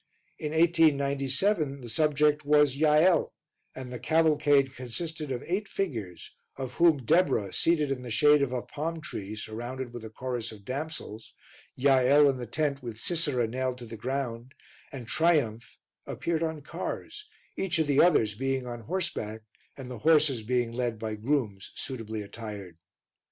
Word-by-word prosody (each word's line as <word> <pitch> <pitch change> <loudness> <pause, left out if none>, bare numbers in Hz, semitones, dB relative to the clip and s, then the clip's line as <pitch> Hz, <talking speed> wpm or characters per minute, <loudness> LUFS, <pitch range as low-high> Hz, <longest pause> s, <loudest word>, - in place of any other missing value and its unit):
In 150 -1 -3
1897 150 -1 +2
the 120 - -8
subject 150 +3 +2
was 145 -2 +4
Jael, 155 +4 +3 0.4
and 130 -1 -7
the 125 - -5
cavalcade 150 -3 +3
consisted 150 +4 -5
of 125 0 -3
eight 195 +4 -2
figures, 110 - -4 0.2
of 130 -2 -5
whom 160 -7 +3
Deborah, 115 - +2
seated 155 -4 +2
in 130 -2 -2
the 125 - -7
shade 150 +6 +5
of 140 -3 0
a 125 -2 -2
palm 165 +3 -4
tree 105 - -6
surrounded 120 +4 -6
with 120 -2 -7
a 110 - -7
chorus 120 0 -4
of 105 -2 -13
damsels, 135 -5 -6 0.4
Jael 135 +2 +5
in 135 -2 +1
the 120 -1 -6
tent 140 +3 -1
with 120 -3 -7
Sisera 145 -5 +1
nailed 130 +2 -2
to 125 - -9
the 115 0 -8
ground, 125 +1 -4 0.4
and 125 -5 -8
Triumph, 120 -7 +1 0.3
appeared 165 -1 -2
on 160 -3 -2
cars, 420 - -6 0.3
each 190 -2 -1
of 160 - +2
the 145 -1 +4
others 130 -12 +4
being 135 +3 -2
on 120 -1 -6
horseback 115 - -3 0.4
and 130 -2 -8
the 120 - -7
horses 150 -4 +4
being 120 +1 0
led 120 -1 -2
by 110 0 -4
grooms 105 -4 -2
suitably 110 -5 -5
attired. 100 -5 -8
135 Hz, 155 wpm, -28 LUFS, 115-155 Hz, 0.4 s, shade